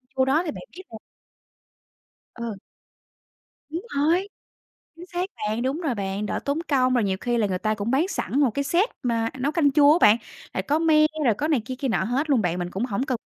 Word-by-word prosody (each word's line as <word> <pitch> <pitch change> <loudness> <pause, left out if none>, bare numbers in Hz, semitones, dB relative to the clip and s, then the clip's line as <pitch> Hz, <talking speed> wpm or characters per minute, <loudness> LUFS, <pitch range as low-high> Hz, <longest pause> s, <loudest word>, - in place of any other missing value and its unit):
chua 260 0 +3
đó 290 +5 +3
thì 310 - -2
bạn - - -9
biết 375 - -9
rồi. 220 - -8 1.4
Ờ. 235 -3 -5 1.1
Đúng 335 +4 -4 0.2
rồi, 340 +7 +2 0.7
chính 345 +2 -10
xác 360 +1 -3
bạn, 215 +2 -2
đúng 275 +7 -1
rồi 275 -8 -1
bạn, 195 +1 -3
đỡ - - -2
tốn 285 +3 0
công, 255 -3 +2
rồi 240 -3 +2
nhiều 190 -1 0
khi 240 -1 0
là 210 -3 +2
người 185 -1 -2
ta 215 0 0
cũng 210 +4 -3
bán 300 +8 +2
sẵn 285 -7 -2
một 275 -4 +4
cái 280 +5 -2
set 365 - +2
mà 230 -2 0
nấu 280 +4 0
canh 300 -3 +3
chua 290 0 +6
á - - +3
bạn, 210 +2 +7 0.4
rồi 190 - -1
có 300 +8 +1
me 310 -2 +5 0.2
rồi 230 - +4
có 300 - -1
này 290 -8 +2
kia 255 - -5
kia 275 - -1
nọ 220 -5 +1
hết 270 +8 -1
luôn 255 -6 +3
bạn, 180 -1 -1
mình 175 0 -3
cũng 210 +6 -2
hổng 225 +2 -2
cần 255 -4 -2
260 Hz, 235 wpm, -24 LUFS, 220-305 Hz, 1.4 s, bạn